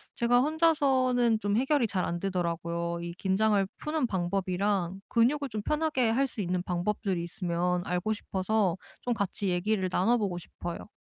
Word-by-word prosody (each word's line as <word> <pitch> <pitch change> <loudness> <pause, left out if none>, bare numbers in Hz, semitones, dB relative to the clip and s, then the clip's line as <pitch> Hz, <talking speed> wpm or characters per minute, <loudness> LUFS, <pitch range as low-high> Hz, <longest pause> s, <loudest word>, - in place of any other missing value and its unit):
제가 245 +1 +3
혼자서는 265 -7 +3
좀 205 -1 0
해결이 270 0 +2
잘 190 -3 -1
안 175 - -2
되더라고요. 170 -2 -2
이 170 0 -5
긴장을 195 +2 +2
푸는 300 -2 -1
방법이랑 190 0 -1
근육을 280 +5 +2
좀 215 -2 -3
편하게 300 -5 +1
할 265 +5 +2
수 235 - -5
있는 180 -1 -1
방법들이 180 0 -1
있으면 175 0 -1
알고 180 +5 -1
싶어서 195 -2 0 0.3
좀 245 - 0
같이 200 -2 -2
얘기를 185 +2 0
나눠 205 +7 +3
보고 200 -6 -1
싶어요. 175 +1 -7
200 Hz, 345 characters per minute, -29 LUFS, 180-240 Hz, 0.3 s, 제가